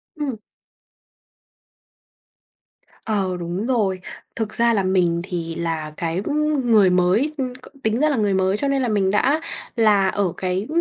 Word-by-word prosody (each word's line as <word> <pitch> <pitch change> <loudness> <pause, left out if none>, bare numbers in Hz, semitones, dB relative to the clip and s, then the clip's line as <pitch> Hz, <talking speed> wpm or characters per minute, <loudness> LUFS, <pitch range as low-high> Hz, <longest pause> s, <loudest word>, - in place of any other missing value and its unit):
Ừm. 290 -5 -3 2.7
Ờ, 195 -4 -1
đúng 175 +5 -3
rồi. 205 -8 +1 0.4
Thực 220 -2 -3
ra 235 0 +3
là 200 -3 +1
mình 175 -3 +1
thì 170 -3 -4
là 160 -2 -3
cái, 170 +2 -2
ừm, 295 -4 0
người 205 -4 +6
mới 185 +11 +2
ừm, 255 -2 -2 0.3
tính 220 +3 +1
ra 305 +1 +3
là 280 - 0
người 205 -3 +1
mới, 190 +1 +1
cho 280 - -1
nên 275 -1 +1
là 250 - 0
mình 200 -3 +1
đã 280 +9 +2 0.3
là 210 -4 +4
ở 190 -4 -1
cái 185 +3 -2
205 Hz, 155 wpm, -22 LUFS, 180-240 Hz, 2.7 s, người